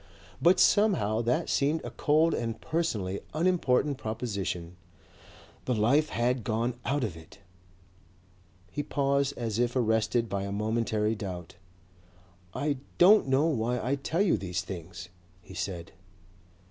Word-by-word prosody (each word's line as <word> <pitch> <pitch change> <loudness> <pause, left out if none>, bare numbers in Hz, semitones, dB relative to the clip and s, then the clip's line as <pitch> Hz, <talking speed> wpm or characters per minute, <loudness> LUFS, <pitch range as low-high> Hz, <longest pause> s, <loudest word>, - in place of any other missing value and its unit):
But 180 +2 +5
somehow 175 - +3
that 120 +2 0
seemed 150 +3 +1
a - - -5
cold 155 +2 +2
and 115 -1 -3
personally 105 - -2 0.2
unimportant 150 -5 +1
proposition. 100 -6 -4 0.9
The 125 - 0
life 135 +9 +3
had 120 -1 0
gone 115 +4 -1
out 140 0 0
of 100 -8 -3
it...." 80 +3 -14 1.3
He 145 - -2
paused 140 -1 0
as 115 -2 -2
if 120 0 +1
arrested 115 -1 +1
by 100 -2 -2
a 100 0 -4
momentary 110 +1 0
doubt. 95 -6 -6 1.0
"I 145 +7 -1 0.2
don't 195 -1 +6
know 135 +3 +3
why 125 -5 0
I 125 +4 -1
tell 155 +7 0
you 195 - +3
these 90 -2 -3
things," 85 -1 -8 0.3
he 95 - -12
said. 85 -2 -5
120 Hz, 135 wpm, -28 LUFS, 100-145 Hz, 1.3 s, don't